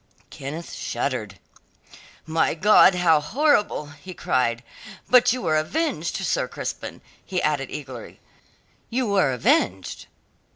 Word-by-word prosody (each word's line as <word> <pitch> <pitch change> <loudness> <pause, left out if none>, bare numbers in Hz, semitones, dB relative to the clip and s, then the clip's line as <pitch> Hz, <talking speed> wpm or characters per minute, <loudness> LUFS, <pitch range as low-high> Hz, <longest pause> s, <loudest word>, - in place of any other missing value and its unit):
Kenneth 150 +5 -7
shuddered. 120 -6 -3 0.9
"My 160 0 +1
God, 190 +1 +6
how 170 -3 +4
horrible!" 210 - +1
he 150 +6 -11
cried. 120 -4 0 0.4
"But 250 -1 +5
you 255 -2 -3
were 155 -3 +2
avenged, 310 - -1
Sir - - 0
Crispin," - - -6 0.2
he 185 -2 -2
added 145 -4 -1
eagerly; 130 -5 -8 0.7
"you 255 +2 -1
were 195 - +2
avenged?" 90 - 0
155 Hz, 115 wpm, -23 LUFS, 130-200 Hz, 0.9 s, God